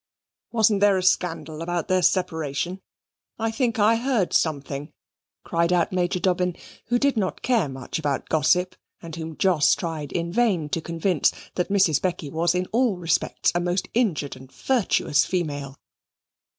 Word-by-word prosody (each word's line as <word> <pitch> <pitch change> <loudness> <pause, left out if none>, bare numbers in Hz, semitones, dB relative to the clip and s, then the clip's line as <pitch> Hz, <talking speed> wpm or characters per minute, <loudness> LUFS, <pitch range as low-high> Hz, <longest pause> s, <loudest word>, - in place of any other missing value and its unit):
Wasn't 220 -3 +3
there 205 -2 +5
a 185 - -1
scandal 175 -4 0
about 175 0 -2
their 185 0 +2
separation? 175 -1 0 0.6
I 225 0 -1
think 235 -1 -1
I 220 +2 +4
heard 235 -6 0
something," 145 -1 -1 0.5
cried 170 0 0
out 175 -2 +2
Major 180 0 0
Dobbin, 180 -1 0 0.3
who 240 +1 +2
did 280 -1 +1
not 190 -4 -2
care 225 - +2
much 130 +3 -5
about 145 -3 -2
gossip, 180 +4 +2 0.3
and 165 -2 -7
whom 160 -1 -7
Jos 170 -7 +3
tried 160 -4 -5
in 170 0 -3
vain 200 -10 +1
to 165 - -2
convince 165 -1 +1 0.2
that 180 - -2
Mrs. 195 -7 +3
Becky 170 -6 -2
was 170 +3 +1
in 180 0 0
all 235 -4 +2
respects 175 -1 0
a 175 - +1
most 180 +2 -1
injured 190 - 0
and 130 0 -14
virtuous 185 - +1
female. 145 -4 -3
175 Hz, 160 wpm, -24 LUFS, 160-195 Hz, 0.6 s, there